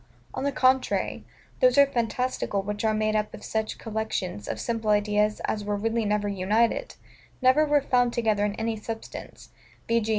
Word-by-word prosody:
On 260 - -4
the 280 - +1
contrary, 260 -1 +1 0.4
those - - +4
are 280 - +8
fantastical 245 -5 -1
which 205 +2 -4
are 220 - +3
made 215 0 0
up 210 0 -1
of - - -13
such 220 0 -2
collections 215 - -3
of - - -4
simple 225 -2 -2
ideas 210 0 +2
as 210 - -2
were 205 0 -1
really 225 +2 -1
never 210 0 0
united, 210 - 0 0.4
never 260 +4 +4
were 290 -1 +3
found 245 -2 +2
together 220 -3 +1
in 205 0 0
any 225 0 -2
substance: 225 +1 -8 0.4
v. 230 0 +3
g. 220 - -4
220 Hz, 175 wpm, -26 LUFS, 210-245 Hz, 0.4 s, are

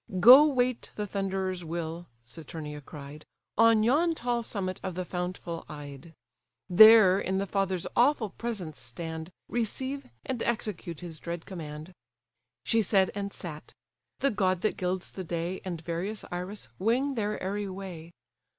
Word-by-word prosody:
"Go 255 +9 +10
wait 255 -4 0
the 210 - -2
Thunderer's 190 -2 -2
will 165 +1 -5 0.2
(Saturnia 150 +3 -7
cried) 145 +1 -10 0.3
On 230 -1 +5
yon 320 +8 +3
tall 240 -3 -1
summit 195 -5 -3
of 185 -2 -4
the 185 0 -3
fountful 180 -2 -4
Ide: 145 +1 -9 0.5
There 200 0 +8
in 190 0 -1
the 195 - 0
father's 190 -2 -1
awful 240 -5 +3
presence 185 - -5
stand, 160 +7 -6 0.2
Receive, 260 +4 -2 0.2
and 250 -3 -3
execute 195 -8 -3
his 165 -3 -7
dread 170 -1 -5
command." 155 -1 -8 0.7
She 225 - +3
said, 195 -2 +3
and 200 0 -4
sat; 155 -9 -8 0.5
the 275 - +3
god 185 -4 +1
that 215 - +1
gilds 185 0 -2
the 190 - -6
day, 170 +2 -3
And 175 -3 -4
various 175 +6 -4
Iris, 180 +4 -5
wing 245 +8 +1
their 210 -3 -2
airy 200 +1 -3
way. 185 -4 -8
185 Hz, 145 wpm, -29 LUFS, 170-220 Hz, 0.7 s, Go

